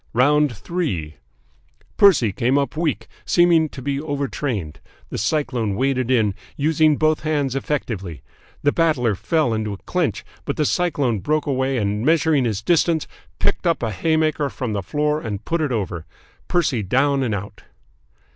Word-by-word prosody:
"ROUND 145 +4 +3
THREE 105 - -3 0.8
"Percy 170 - +5
came 125 +8 +1
up 140 +2 -1
weak, 160 -1 -1 0.2
seeming 170 -3 +4
to 130 - -9
be 140 +1 -1
overtrained. 135 - -3 0.3
The - - -3
Cyclone 115 -3 0
waded 130 +1 0
in, 110 -6 +3 0.2
using 155 0 +3
both 155 0 +2
hands 145 -4 -1
effectively. 105 - -3 0.4
The 145 - +4
Battler 145 -10 +2
fell 150 - 0
into 110 -1 -2
a - - -7
clinch, - - -2 0.2
but - - -3
the 150 - +1
Cyclone 145 - 0
broke 155 +9 0
away 135 -2 0
and, 105 -1 -1
measuring 155 -2 +3
his 110 -4 -2
distance, 165 -2 +2 0.3
picked 200 -3 0
up 165 -6 +1
a 115 - -1
haymaker 155 - +1
from 125 -4 -4
the 100 - -1
floor 150 +8 -1
and 105 -4 -5
put 170 0 0
it 150 -3 0
over. 90 -7 -3 0.4
Percy 145 -10 +1
down 135 +7 +2
and 115 -5 0
out. 100 +1 -7
140 Hz, 155 wpm, -21 LUFS, 110-155 Hz, 0.8 s, Percy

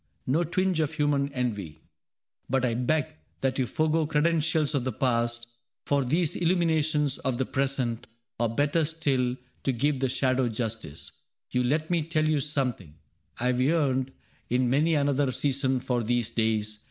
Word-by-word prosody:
No 150 +7 +2
twinge 185 +1 0
of 155 -1 0
human 145 -2 +1
envy. 105 - -3 0.7
But 130 0 +2
I 120 - +1
beg 130 +5 +1 0.4
That 135 0 0
you 130 - +1
forego 155 +2 +1
credentials 160 0 +1
of 140 -4 0
the 130 - -1
past 120 -1 0 0.4
For 140 -1 +2
these 155 +5 +1
illuminations 160 -5 +1
of 130 -2 -1
the 130 - 0
present. 130 -4 -1 0.3
Or 120 -1 +2
better 145 +7 +1
still, 140 -6 0 0.3
to 135 - +1
give 135 +3 0
the 135 -1 +1
shadow 130 -1 +1
justice. 105 - -5 0.4
You 125 0 +1
let 155 +6 0
me 170 -2 +2
tell 155 0 0
you 155 -1 +2
something: 130 - -2 0.4
I 120 - -2
have 125 0 +2
yearned 135 -3 +1 0.4
In 125 0 +2
many 155 +4 +3
another 140 -2 +2
season 135 -1 0
for 125 -1 -1
these 120 0 0
days. 110 -2 0
135 Hz, 160 wpm, -27 LUFS, 120-150 Hz, 0.7 s, many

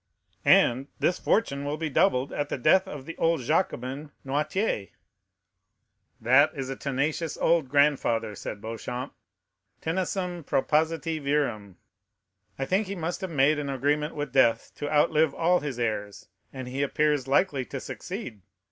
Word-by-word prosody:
"And 130 +3 +5
this 180 - +1
fortune 140 -10 +1
will 145 +1 -2
be 160 0 -2
doubled 145 -3 +2
at 145 0 -2
the - - -2
death 190 +9 +4
of 145 -7 -8
the 165 - -7
old 165 -3 +2
Jacobin, 140 -1 -1 0.2
Noirtier." 145 - -1 1.3
"That 130 +6 +5
is 135 -2 -4
a - - -3
tenacious 145 +4 -2
old 165 -5 +2
grandfather," 130 -6 +2
said 105 +1 -7
Beauchamp. 125 +4 -5 0.7
"Tenacem 180 0 -2
propositi 160 +3 0
virum. 130 -9 -1 0.8
I 135 - -2
think 190 +7 +1
he 200 - -4
must 175 +2 -3
have 190 - -3
made 150 0 +3
an 145 -1 -3
agreement 145 +3 0
with 145 -3 -4
death 120 -4 +3
to 145 - -4
outlive 150 0 +3
all 175 +2 +3
his 140 -4 -5
heirs, 105 -4 -3 0.2
and 130 -2 -7
he 130 +2 -3
appears 145 -1 +1
likely 140 -1 +2
to 135 - -6
succeed. 180 - -7
145 Hz, 150 wpm, -27 LUFS, 130-160 Hz, 1.3 s, And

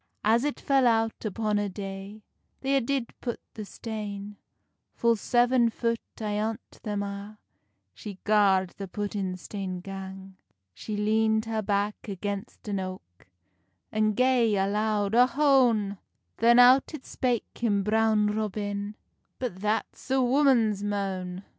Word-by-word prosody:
As 225 +3 +3
it 295 0 -2
fell 270 -2 +3
out 225 -1 +1
upon 215 0 0
a 205 -1 -1
day, 195 +2 -7 0.4
They 275 0 +1
a 270 - +3
did 255 -1 -2
put 240 -2 -3
the 215 - -6
stane; 205 -1 -6 0.6
Full 235 0 +3
seven 240 +2 +3
foot 230 0 -1 0.2
ayont 215 +2 -3
them 205 -2 -2
a 200 +1 -7 0.6
She 200 - -8
gard 195 -3 +3
the 195 - -5
puttin 195 -2 -3
stane 185 -1 -5
gang. 190 0 -8 0.4
She 210 - -5
leand 220 +1 +2
her 225 -1 -1
back 205 0 0
against 200 +1 -5
an 200 -2 -1
oak, 185 - -8 0.6
And 215 -1 +1
gae 250 -3 +3
a 195 -1 +2
loud 210 0 0
Ohone! 245 -6 +3 0.4
Then 235 +1 +5
out 255 +5 +6
it 275 - -10
spake 245 -3 -2
him 205 -4 +1
Brown 215 0 +3
Robin, 210 -1 -2 0.4
"But 245 -8 -4
that's 215 +5 -2
a 265 +1 +3
woman's 245 -6 +3
moan!" 190 -2 -3
210 Hz, 135 wpm, -27 LUFS, 200-230 Hz, 0.6 s, out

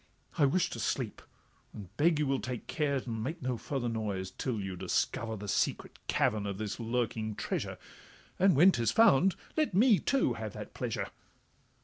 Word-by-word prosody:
I 145 - +4
wish 175 +6 +1
to - - -5
sleep, - - -2 0.5
and 100 -1 -10
beg 160 +3 +3
you 150 - +1
will 135 -1 +1
take 125 -2 -5
care 150 -2 0
And 115 -4 -3
make 160 +8 -3
no 125 -1 0
further 125 +1 -3
noise, 105 -5 -3
till 115 +3 -3
you 95 -2 -4
discover 110 +5 -1
The 105 +1 -7
secret - - -1
cavern 105 -1 +1
of 100 -1 -3
this 105 +1 -4
lurking 115 -2 -1
treasure— - - -3 0.6
And 190 -1 +5
when 175 +7 +7
'tis 115 - +1
found, 195 - +5 0.2
let 310 - +1
me, 220 0 +6
too, 275 - +1
have - - -5
that - - -8
pleasure. - - -3
125 Hz, 175 wpm, -31 LUFS, 110-160 Hz, 0.6 s, when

